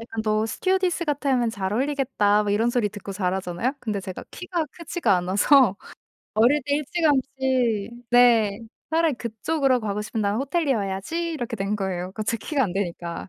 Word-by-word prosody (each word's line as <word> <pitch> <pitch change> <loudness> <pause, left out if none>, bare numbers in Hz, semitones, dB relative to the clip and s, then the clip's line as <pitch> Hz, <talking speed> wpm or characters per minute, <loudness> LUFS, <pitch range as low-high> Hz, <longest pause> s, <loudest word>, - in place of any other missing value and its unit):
약간 225 -1 -5
"너 215 0 +1
스튜어디스 370 - 0
같으면 275 -5 +1
잘 195 -2 -3
어울리겠다." 245 -5 +1
뭐 205 - -2
이런 225 +4 +2
소리 240 -4 +1
듣고 200 -1 -8
자라잖아요. 190 +4 -1
근데 215 -5 -3
제가 185 -1 -7
키가 360 -3 -3
크지가 335 - 0
않아서 200 +5 +4 0.6
어릴 250 +7 +4
때 285 +1 +1
일찌감치 265 - 0 0.2
네. 230 -4 +5 0.3
'차라리 320 -2 +2
그쪽으로 250 +4 0
가고 210 -1 -2
싶으면 215 +1 -3
나는 205 +1 0
호텔리어 275 -3 0
해야지.' 200 - -3
이렇게 240 -6 -4
된 200 +1 -1
거예요 185 -2 -3
그 215 - -4
제 230 +2 0
키가 285 +4 -1
안 185 - -3
되니까. 175 -3 -4
230 Hz, 385 characters per minute, -24 LUFS, 200-280 Hz, 0.6 s, 네